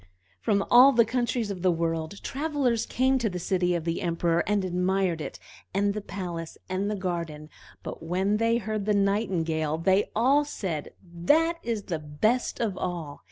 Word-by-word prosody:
From 200 Hz, -, +1 dB
all 255 Hz, +3 st, +8 dB
the 235 Hz, -2 st, +5 dB
countries 240 Hz, -2 st, -1 dB
of 185 Hz, -3 st, -6 dB
the 185 Hz, -, +3 dB
world 165 Hz, +2 st, -2 dB
travelers 275 Hz, -5 st, 0 dB
came 260 Hz, +1 st, +2 dB
to 230 Hz, -3 st, 0 dB
the 180 Hz, -, -4 dB
city 180 Hz, 0 st, 0 dB
of 170 Hz, -, -2 dB
the 165 Hz, 0 st, -1 dB
Emperor, 170 Hz, -1 st, +1 dB
and 205 Hz, -2 st, +1 dB
admired 180 Hz, -1 st, 0 dB
it, -, -, -6 dB, 0.4 s
and 200 Hz, +1 st, +2 dB
the 210 Hz, -, -4 dB
palace, 175 Hz, -5 st, -6 dB
and 190 Hz, +2 st, -1 dB
the 210 Hz, -, -1 dB
garden; 170 Hz, -5 st, -4 dB, 0.3 s
but -, -, -7 dB
when 190 Hz, +5 st, 0 dB
they 230 Hz, +1 st, +2 dB
heard 215 Hz, -3 st, -3 dB
the 210 Hz, -, +3 dB
Nightingale, 170 Hz, -7 st, 0 dB
they 190 Hz, +4 st, +2 dB
all 265 Hz, +7 st, +4 dB
said, 180 Hz, -, -4 dB
"That 295 Hz, -, +1 dB
is 230 Hz, -3 st, -2 dB
the 165 Hz, -5 st, -3 dB
best 155 Hz, +12 st, 0 dB
of 220 Hz, -5 st, -1 dB
all!" 170 Hz, -5 st, -4 dB
195 Hz, 175 wpm, -27 LUFS, 170-225 Hz, 0.4 s, all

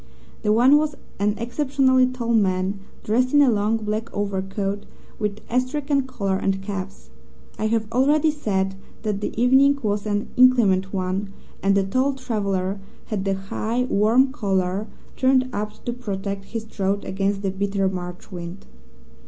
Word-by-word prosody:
The 210 Hz, -, +1 dB
one 250 Hz, +6 st, +6 dB
was 300 Hz, -1 st, 0 dB, 0.2 s
an 205 Hz, +1 st, +1 dB
exceptionally 260 Hz, +1 st, +2 dB
tall 245 Hz, -2 st, -2 dB
man, 195 Hz, -2 st, +1 dB, 0.2 s
dressed 250 Hz, +5 st, +1 dB
in 290 Hz, -, +7 dB
a 260 Hz, -, +4 dB
long 215 Hz, +1 st, +1 dB
black 215 Hz, +1 st, -3 dB
overcoat 200 Hz, 0 st, -3 dB, 0.3 s
with 210 Hz, -1 st, -2 dB
astrakhan 275 Hz, +2 st, 0 dB
collar 200 Hz, -7 st, -1 dB
and 195 Hz, 0 st, -1 dB
cuffs. 195 Hz, -1 st, -6 dB, 0.5 s
I 215 Hz, -, +1 dB
have 225 Hz, 0 st, +1 dB
already 290 Hz, +5 st, +3 dB
said 195 Hz, -9 st, -1 dB, 0.3 s
that 210 Hz, -2 st, -1 dB
the 210 Hz, -, -3 dB
evening 265 Hz, +3 st, +5 dB
was 205 Hz, 0 st, -1 dB
an 205 Hz, 0 st, -1 dB
inclement 215 Hz, -7 st, +4 dB
one, 190 Hz, +1 st, -2 dB, 0.3 s
and 195 Hz, 0 st, +3 dB
the 195 Hz, -, +3 dB
tall 255 Hz, +8 st, +1 dB
traveller 200 Hz, -6 st, -2 dB, 0.3 s
had 205 Hz, -3 st, -2 dB
the 195 Hz, 0 st, +1 dB
high, 215 Hz, +5 st, -2 dB
warm 245 Hz, +4 st, +3 dB
collar 195 Hz, -4 st, -1 dB, 0.3 s
turned 260 Hz, -1 st, +3 dB
up 210 Hz, +1 st, -3 dB
to 240 Hz, -, -1 dB
protect 200 Hz, -4 st, -4 dB
his 225 Hz, +1 st, -5 dB
throat 200 Hz, -2 st, -2 dB
against 195 Hz, +1 st, -1 dB
the 195 Hz, -, 0 dB
bitter 195 Hz, 0 st, 0 dB
March 180 Hz, 0 st, -6 dB
wind. 175 Hz, +1 st, -7 dB
210 Hz, 150 wpm, -23 LUFS, 195-250 Hz, 0.5 s, in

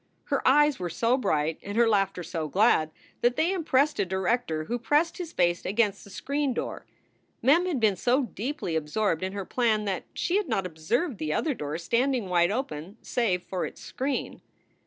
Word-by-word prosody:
Her 280 Hz, -2 st, +1 dB
eyes 295 Hz, +1 st, +5 dB
were 180 Hz, -1 st, -3 dB
so 230 Hz, +8 st, +2 dB
bright 155 Hz, -, 0 dB
and 205 Hz, +2 st, -5 dB
her 235 Hz, 0 st, +5 dB
laughter 195 Hz, -4 st, +1 dB
so 165 Hz, -2 st, -3 dB
glad 170 Hz, -, +3 dB, 0.3 s
that 240 Hz, +1 st, +3 dB
they 335 Hz, +7 st, +2 dB
impressed 300 Hz, -, +1 dB
a -, -, +4 dB
director 190 Hz, -3 st, -1 dB
who 240 Hz, +9 st, -3 dB
pressed 300 Hz, +8 st, +1 dB
his 340 Hz, -2 st, -5 dB
face 175 Hz, -1 st, +1 dB
against 205 Hz, 0 st, 0 dB
the -, -, -14 dB
screen 280 Hz, +5 st, -2 dB
door. -, -, -4 dB, 0.6 s
Mem 325 Hz, +9 st, +4 dB
had 320 Hz, -8 st, -1 dB
been 215 Hz, -3 st, +3 dB
so 250 Hz, +8 st, +2 dB
deeply 245 Hz, -, -4 dB
absorbed 160 Hz, +3 st, 0 dB
in 190 Hz, +1 st, -3 dB
her 200 Hz, -2 st, -4 dB
plan 220 Hz, -3 st, +1 dB
that 195 Hz, -3 st, -2 dB
she 360 Hz, +3 st, +1 dB
had 410 Hz, -8 st, -1 dB
not 195 Hz, -5 st, 0 dB
observed 195 Hz, -, -2 dB
the 155 Hz, -1 st, -2 dB
other 305 Hz, -, 0 dB
door 150 Hz, -, -4 dB
standing 235 Hz, +4 st, 0 dB
wide 175 Hz, -1 st, +3 dB
open 200 Hz, -, -4 dB
save 190 Hz, -7 st, 0 dB
for 185 Hz, -, -3 dB
its -, -, -6 dB
screen. 270 Hz, +1 st, -3 dB
220 Hz, 190 wpm, -27 LUFS, 180-265 Hz, 0.6 s, eyes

